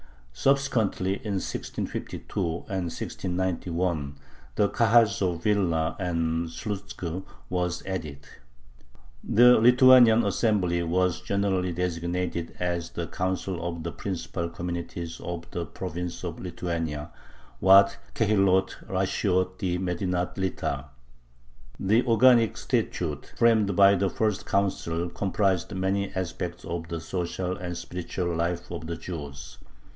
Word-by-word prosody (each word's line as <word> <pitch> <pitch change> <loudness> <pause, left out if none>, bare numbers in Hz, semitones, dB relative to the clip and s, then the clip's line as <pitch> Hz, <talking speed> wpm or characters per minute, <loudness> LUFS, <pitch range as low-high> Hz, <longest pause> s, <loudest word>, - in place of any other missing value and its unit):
Subsequently, 110 - +1
in 105 - -4
1652 95 - -4 0.3
and 95 -2 -2
1691, 90 -5 -2 0.4
the 105 - +3
Kahals 115 -3 +4
of 85 -3 -1
Vilna 85 -6 +1
and 85 -2 -1
Slutzk 95 -2 -5 0.3
were 90 0 +1 0.2
added. 75 -7 -5 1.0
The 125 +2 +6
Lithuanian 125 -1 +7
assembly 100 -5 +1
was 90 +1 +1
generally 95 -2 0
designated 85 0 -2
as 85 -2 -2
the 85 - -3
"Council 95 0 -2
of 85 -1 -4
the 85 - -3
Principal 85 -2 -4
Communities 85 -1 -5
of 85 -1 -5
the 85 -2 -3
Province 85 +5 -5
of 85 -2 -5
Lithuania" 85 -4 -4 0.5
(Waad 100 +3 +7 0.2
Kehilloth 95 -3 +2
Rashioth 95 -1 0
di 90 -2 0
Medinath 90 0 -2
Lita). 75 -7 -2 0.9
The 110 +6 +3
organic 120 -1 +5
statute, 75 -1 -2
framed 110 -4 +4
by 100 +1 +7
the 100 0 +1
first 110 -5 -1
Council, 90 -4 0
comprises 95 -1 0
many 95 +1 -1
aspects 90 -1 -4
of 85 0 -4
the 85 0 -4
social 90 +1 -3
and 90 -3 -5
spiritual 90 0 -3
life 85 +1 -2
of 80 - -5
the 85 - -3
Jews. 70 -7 -8
90 Hz, 115 wpm, -27 LUFS, 85-100 Hz, 1.0 s, Lithuanian